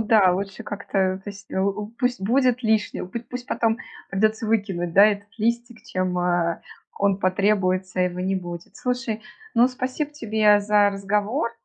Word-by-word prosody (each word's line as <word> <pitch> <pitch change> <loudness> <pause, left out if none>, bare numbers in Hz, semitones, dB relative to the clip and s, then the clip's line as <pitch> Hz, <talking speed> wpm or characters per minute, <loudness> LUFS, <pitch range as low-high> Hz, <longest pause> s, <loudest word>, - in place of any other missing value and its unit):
да, 210 -4 +5
лучше 195 +1 -4
как-то 190 -2 -1
пусть, 205 -1 -10
э, - - -2 0.4
пусть 250 0 +1
будет 250 +4 +2
лишним, 220 -4 0
путь 235 +3 -6
пусть 250 0 -6
потом 225 -5 +1 0.3
придется 215 +3 +1
выкинуть, 195 -6 -1
да, 200 - +8
этот 205 -1 +1
листик, 235 +1 -1
чем, 185 -4 -1
э, 175 -1 0 0.4
он 200 -1 +2
потребуется, 185 -1 +1
а - - +5
его 180 0 -3
не 190 +1 0
будет. 175 -2 -6
Слушай, 250 -3 -2 0.3
ну 240 +2 +5
спасибо 260 +3 -3
тебе 215 -7 +3
за 205 0 +4
разговор, 205 +5 -1
205 Hz, 155 wpm, -24 LUFS, 190-230 Hz, 0.4 s, да